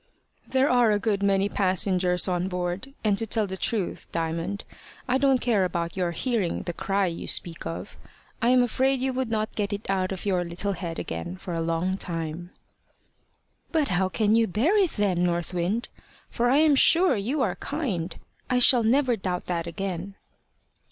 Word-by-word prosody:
"There 265 +1 +2
are 245 -4 +4
a 210 - +3
good 205 -1 -1
many 200 0 +2
passengers 185 -2 +2
on 180 0 0
board; 180 +8 -4
and 205 -2 +2
to 225 - -3
tell 220 0 +1
the 190 -1 -5
truth, 195 0 -2
Diamond, 165 +4 -2 0.4
I 260 +1 +2
don't 270 -1 +4
care 225 -6 +2
about 170 -2 -2
your 180 -2 0
hearing 205 0 -1
the 175 - -4
cry 195 +3 0
you 170 -2 -4
speak 165 -2 -1
of. 165 - -7 0.4
I 235 - +3
am 250 0 +5
afraid 260 +2 +1
you 260 +1 -1
would 255 -2 -2
not 215 -1 -1
get 205 -1 -2
it 205 +1 -5
out 185 -1 0
of 190 0 -5
your 185 -3 +1
little 175 +4 -1
head 170 -3 -5
again 85 - -5
for 180 -1 -6
a 165 - -1
long 165 +4 -1
time." 165 0 -4 1.2
"But 315 -4 +1
how 185 0 +1
can 210 +4 +1
you 225 0 +4
bear 245 - +1
it 390 -5 +3
then, 190 -4 +1
North 175 0 -1
Wind? 185 +7 -1 0.4
For 240 +1 +1
I 265 - +4
am 310 -1 +5
sure 335 +3 +5
you 250 +8 -1
are - - -1
kind. 225 - -3 0.3
I 250 - +2
shall 250 0 +6
never 250 +2 +3
doubt 185 -4 -3
that 170 -2 -2
again." 190 +2 -4
195 Hz, 185 wpm, -26 LUFS, 175-240 Hz, 1.2 s, shall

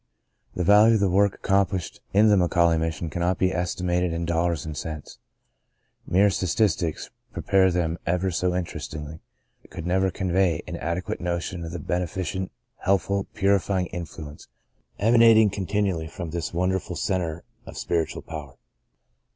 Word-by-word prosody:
The 90 - -1
value 105 +5 +6
of - - +2
the 100 -2 +2
work 100 +1 +3
accomplished 95 -2 0
in 105 +3 +5
the 105 - +6
McAuley 85 -3 +3
Mission 80 0 -3
cannot 85 +3 0
be 95 0 +1
estimated 90 0 0
in 85 0 -2
dollars 85 -1 0
and 80 -1 -5
cents. 75 0 -7 0.9
Mere 100 +3 +4
statistics, 90 -3 0 0.2
pre - - -5
pare 95 -1 +4
them 85 -1 -1
ever 90 +2 +1
so 90 +1 0
interestingly, 80 -3 -5 0.5
could 85 -2 -7
never 95 +2 +2
convey 95 -3 0
an - - -5
adequate 85 +3 -3
notion 85 0 -3
of 80 - -6
the 85 - -4
benefi 90 +3 -2
cent, 95 +4 -3 0.3
helpful, 100 +1 0
purifying 100 -1 +2
influence, 80 -4 -8 0.5
emana 115 +1 +6
ting 110 -2 +5
continually 95 -4 -1
from 85 0 -7
this 85 -1 -3
wonderful 90 0 -1
cen 95 +2 0
tre 85 -1 -4 0.3
of - - -9
spiritual 85 -2 -2
power. 75 -4 -8
90 Hz, 150 wpm, -25 LUFS, 85-95 Hz, 0.9 s, value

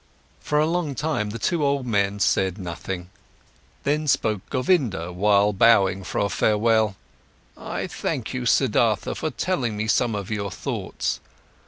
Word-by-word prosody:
For 150 - -1
a 150 - +4
long 165 -4 -1
time, 150 -8 -1
the 110 - -5
two 155 +8 0
old 140 -2 +1
men 100 -3 0
said 95 -1 +1
nothing. 90 0 -6 0.7
Then 150 +2 0
spoke 110 -7 +1
Govinda, 125 - 0
while 100 +2 +3
bowing 95 -2 +4
for - - -5
a 100 - +2
farewell: 110 -1 +2 0.6
"I - - -4
thank - - -3
you, 125 -1 -2
Siddhartha, 115 -3 +2
for 155 - -3
telling 130 - -2
me 110 - -1
some 115 0 +2
of 100 0 -5
your 100 -2 -2
thoughts. - - -3
110 Hz, 150 wpm, -24 LUFS, 100-140 Hz, 0.7 s, a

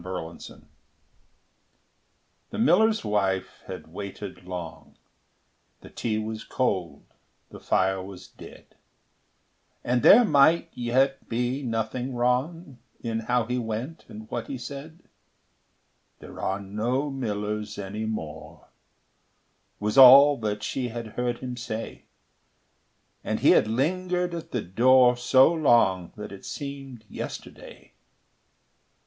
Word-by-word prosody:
The 90 - -8
Mill 85 -3 -7 1.9
The - - -7
miller's 215 - +3
wife 95 -3 -1
had 80 - -9
waited 100 -1 -8
long, 90 -3 -8 0.8
The - - -13
tea 110 -2 -2
was 110 0 -4
cold, 90 - -2 0.5
the - - -10
fire 95 0 +1
was 95 0 -10
dead; - - -15 1.1
And 125 0 +1
there 240 - +8
might 160 +1 +4
yet 130 +3 0
be 125 +4 -1
nothing 120 +1 -3
wrong 130 +4 -1 0.2
In 115 -1 -2
how 120 +1 0
he 125 +2 -2
went 120 +8 -5
and 110 +1 -10
what - - -4
he 135 - -5
said: 145 +7 -9 1.1
"There - - -11
are 95 +1 -1
no 115 +8 -2
millers 105 -4 -4
any 105 +2 -5
more," 80 -9 -7 1.1
Was 105 +5 +1
all 140 +3 +10
that 105 -2 -3
she 125 +3 -2
had 115 -1 -6
heard 120 +2 -3
him 125 -1 -5
say; 115 -2 -6 1.2
And - - -2
he - - +6
had - - +4
lingered 180 +8 -1
at 170 -1 -6
the 120 - -2
door 125 +6 +4
So 130 +5 +4
long 115 - +2
that 105 -1 -8
it 100 - -11
seemed 135 -5 -7
yesterday. - - -9
120 Hz, 120 wpm, -26 LUFS, 105-135 Hz, 1.9 s, all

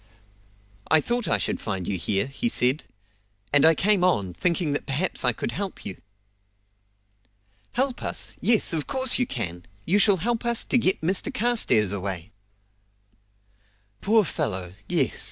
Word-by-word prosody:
"I 160 - +5
thought 240 +7 -2
I - - +2
should - - -3
find 95 -5 -4
you 100 - -1
here," 95 +3 0
he 140 - -3
said; 130 - 0 0.7
"and 145 0 +5
I 160 0 +6
came 200 +2 +2
on, 100 - +1
thinking 170 - -1
that 145 - -3
perhaps 150 +8 -1
I 125 - +4
could 115 - -5
help 195 +6 -5
you." 95 - -5 1.8
"Help 260 +1 -1
us! - - -5
yes, 225 -6 +3
of 155 -3 -2
course 260 -2 +4
you 250 - 0
can! 90 -8 -4 0.2
You 195 +5 +2
shall 200 -1 +4
help 235 +6 -2
us 235 -1 +3
to 250 - +2
get 190 -4 +1
Mr 185 +4 +1
Carstairs 230 - +2
away!" 95 -1 -4 1.7
"Poor 215 0 +3
fellow; 90 - -3 0.2
yes!" - - 0
165 Hz, 155 wpm, -24 LUFS, -, 1.8 s, I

